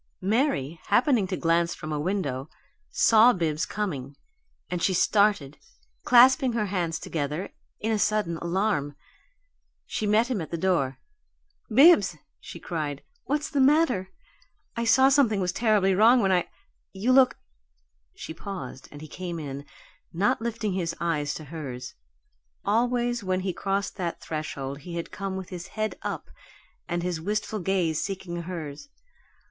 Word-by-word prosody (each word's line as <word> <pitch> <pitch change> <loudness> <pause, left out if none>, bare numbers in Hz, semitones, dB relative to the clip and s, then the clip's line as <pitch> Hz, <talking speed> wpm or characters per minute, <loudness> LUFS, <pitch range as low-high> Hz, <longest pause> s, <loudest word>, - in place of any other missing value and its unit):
Mary, 190 - 0
happening 240 -6 +3
to 185 - -3
glance 170 0 +1
from 155 - -7
a 150 - -1
window, 150 -6 -2 0.4
saw 225 +2 +6
Bibbs 165 -4 -1
coming, 145 -10 -4 0.5
and 180 -1 -3
she 185 - +2
started, 200 -8 +2 0.5
clasping 255 +1 +6
her 220 -2 0
hands 175 -5 -1
together 150 +4 -4 0.3
in 220 - -1
a 215 - +1
sudden 205 -6 +1
alarm. 170 -5 -1 0.9
She 215 - -3
met 215 +3 +4
him 245 -7 -2
at 160 - -6
the 170 - -3
door. 160 -7 0 0.7
"Bibbs!" 265 - +6 0.2
she 170 - -10
cried. 150 -5 -4 0.2
"What 290 +2 0
is - - -6
the 285 - 0
matter? 265 - +3 0.7
I 235 0 -1
saw 265 +4 +6
something 260 -7 +3
was 180 -2 0
terribly 210 -2 +2
wrong 225 +6 +6
when 195 -4 +2
I 180 -2 +2 0.5
You 205 +6 0
look 260 0 +5 0.4
" - - -45
She - - -7
paused, 160 -8 -7
and 145 - -11
he 155 - -8
came 175 +2 -6
in, 140 -2 -6 0.5
not 205 +9 +1
lifting 225 -3 -2
his 170 -3 -2
eyes 150 -3 -1
to 155 - -7
hers. 130 -6 -6 0.7
Always 240 +1 +1
when 185 -1 0
he 185 -1 -2
crossed 200 +2 -2
that 175 -3 -3
threshold 140 -3 -5
he 170 +4 -8
had 170 - -5
come 195 -1 -4
with 190 -2 -7
his 180 -1 -7
head 215 0 -1
up - - -5 0.6
and 175 0 -2
his 175 -3 -2
wistful 210 +3 -2
gaze 175 -4 0
seeking 180 -3 -4
hers. 165 - -7
185 Hz, 155 wpm, -26 LUFS, 160-215 Hz, 0.9 s, saw